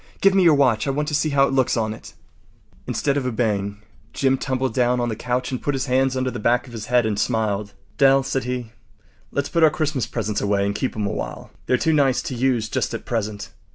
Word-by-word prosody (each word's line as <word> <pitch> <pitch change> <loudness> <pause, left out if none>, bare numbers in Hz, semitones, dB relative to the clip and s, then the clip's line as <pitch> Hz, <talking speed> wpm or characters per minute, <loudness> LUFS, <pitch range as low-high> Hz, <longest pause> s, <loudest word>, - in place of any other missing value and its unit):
Give 195 0 +4
me 195 - +4
your 165 -4 +6
watch. 130 -3 +2
I - - +1
want 145 +2 -1
to - - -5
see 155 +1 +1
how 140 -1 +4
it 135 - -2
looks 130 -3 +2
on 110 -1 0
it.” - - -12 0.7
Instead 140 -1 0
of 135 - -1
obeying, 105 -4 -1 0.3
Jim 135 -1 +2
tumbled 130 0 -2
down 125 -1 +2
on 120 0 0
the 110 - -2
couch 125 +3 -2
and 130 - -3
put 145 - -1
his 135 - -1
hands 130 0 +1
under 130 0 -1
the 120 - -5
back 120 +4 +2
of 125 - -13
his 110 -2 -6
head 125 -1 +3
and 105 -2 -1
smiled. 105 -3 -1 0.3
“Dell,” 135 -1 +5
said 135 -1 -2
he, 125 -2 -4 0.6
“let’s 140 0 -2
put 170 - 0
our 160 - +7
Christmas 150 -4 -1
presents 105 -3 -2
away 100 -1 +1
and 100 - -1
keep 130 - -3
’em 105 -1 -2
a - - -1
while. - - -6 0.2
They’re 130 - +3
too 160 +6 +1
nice 135 -4 +2
to - - -4
use 120 -3 +1
just - - -2
at - - -7
present. 110 -3 -3
125 Hz, 245 wpm, -22 LUFS, 110-135 Hz, 0.7 s, our